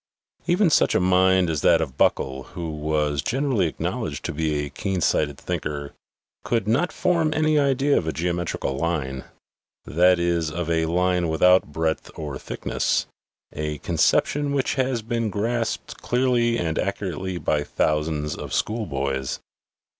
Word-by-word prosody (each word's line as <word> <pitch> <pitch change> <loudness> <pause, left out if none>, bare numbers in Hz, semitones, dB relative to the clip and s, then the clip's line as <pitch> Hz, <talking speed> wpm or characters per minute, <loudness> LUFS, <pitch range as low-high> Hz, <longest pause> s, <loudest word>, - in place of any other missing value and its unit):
Even 175 0 +3
such - - +3
a - - +4
mind 95 0 +4
as 80 -3 -1
that 85 - +5
of 70 -6 -3
Buckle/ 65 -1 +1 0.2
who 85 -2 -3
was 75 -1 -1
generally 130 -7 +1
acknowledged 80 - -4
to - - -2
be 75 -1 -1
a 70 - -9
keen 95 -2 -2
sighted 75 -3 +1
thinker, 70 -1 -4 0.5
could 115 -4 0
not 140 +11 +2
form 170 -4 +1
any 155 -1 +3
idea 140 0 +2
of 80 - -6
a - - +1
geometrical 85 -4 -2
line 70 -4 -2 0.6
that 90 +3 +4
is, 85 -2 0
of 85 +1 -3
a 80 0 +1
line 90 +1 +1
without 90 0 +4
breadth 80 +1 -1
or 75 -4 -5
thickness, - - -1 0.5
a 75 0 -3
conception 145 - +1
which 135 -2 0
has 130 -4 -1
been 115 -1 -1
grasped 115 +4 -2
clearly 120 -2 +2
and 80 -5 -1
accurately 95 -1 -3
by 75 -3 0
thousands 75 0 -1
of - - -7
school 110 -1 -1
boys. 65 -2 -2
85 Hz, 150 wpm, -24 LUFS, 75-115 Hz, 0.6 s, that